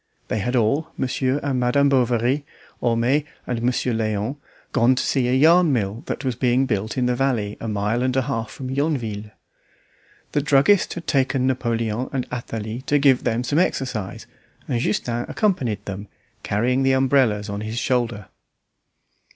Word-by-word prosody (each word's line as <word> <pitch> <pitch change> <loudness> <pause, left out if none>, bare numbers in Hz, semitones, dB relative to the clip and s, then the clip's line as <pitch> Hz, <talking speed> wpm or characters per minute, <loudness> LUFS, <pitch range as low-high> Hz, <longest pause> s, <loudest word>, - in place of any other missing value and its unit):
They 110 - 0
had 125 +6 -1
all, 125 +7 +2
Monsieur 130 +1 0
and 135 -3 0
Madame 125 +3 +3
Bovary, 125 +1 +2 0.4
Homais, 120 +5 +2 0.2
and 120 -2 -2
Monsieur 125 0 0
Léon, 110 +3 -1 0.3
gone 125 +3 +4
to - - -1
see 130 -3 +1
a 125 - +2
yarn 165 +4 +5
mill 110 -2 -1
that 135 - -4
was 130 -2 0
being 125 +2 +2
built 110 0 -2
in 125 - +2
the 125 0 +1
valley 120 -6 0
a 115 - -4
mile 105 +2 0
and 130 0 0
a 130 - +3
half 115 -4 -3
from 130 -1 -7
Yonville. 120 -8 -2 1.0
The 145 - +1
druggist 150 +7 +3
had 175 - -7
taken 135 -2 +1
Napoleon 120 -2 -1
and 130 -3 -2
Athalie 115 -1 -5
to 145 - +3
give 135 -3 +4
them 120 0 0
some 145 +5 +1
exercise, 125 - -2 0.4
and 120 - 0
Justin 120 +2 -1
accompanied 175 - 0
them, 100 +1 -6 0.3
carrying 120 +6 +1
the 135 0 +3
umbrellas 130 -6 +2
on 100 0 -4
his 110 +2 -5
shoulder. 120 -4 0
125 Hz, 165 wpm, -22 LUFS, 115-135 Hz, 1.0 s, yarn